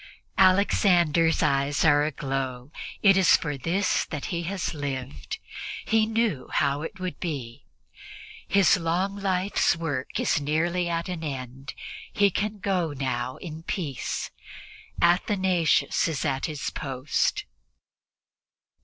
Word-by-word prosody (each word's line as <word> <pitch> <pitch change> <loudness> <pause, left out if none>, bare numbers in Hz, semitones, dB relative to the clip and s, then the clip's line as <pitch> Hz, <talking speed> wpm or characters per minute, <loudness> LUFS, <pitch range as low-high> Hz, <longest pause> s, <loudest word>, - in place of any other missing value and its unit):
Alexander's 180 -4 +4
eyes 140 +2 +1
are 145 -2 +5
aglow; 135 -3 -3 0.3
it 195 -2 +7
is 190 -1 +6
for 150 -3 -3
this 175 +8 +1
that 150 -4 -5
he 170 - -1
has 185 +2 -3
lived; 140 -3 -5 0.5
he 220 -1 +3
knew 220 - 0
how 140 +1 +1
it 175 +4 -7
would 185 -1 -4
be. 135 -9 -5 0.8
His 200 0 +5
long 180 +4 -1
life's 195 -2 +1
work 145 -6 -3
is - - +1
nearly 170 +4 0
at 170 +1 -2
an 180 -3 -4
end; 135 -2 -6 0.4
he 200 -1 +3
can 210 +3 -2
go 185 -6 -1
now 130 -2 -2
in 160 -2 -8
peace. 160 - -3 0.7
Athanasius 180 -2 +2
is 160 -3 -2
at 135 -2 0
his 150 -3 -4
post. 135 0 -1
165 Hz, 120 wpm, -26 LUFS, 140-185 Hz, 0.8 s, it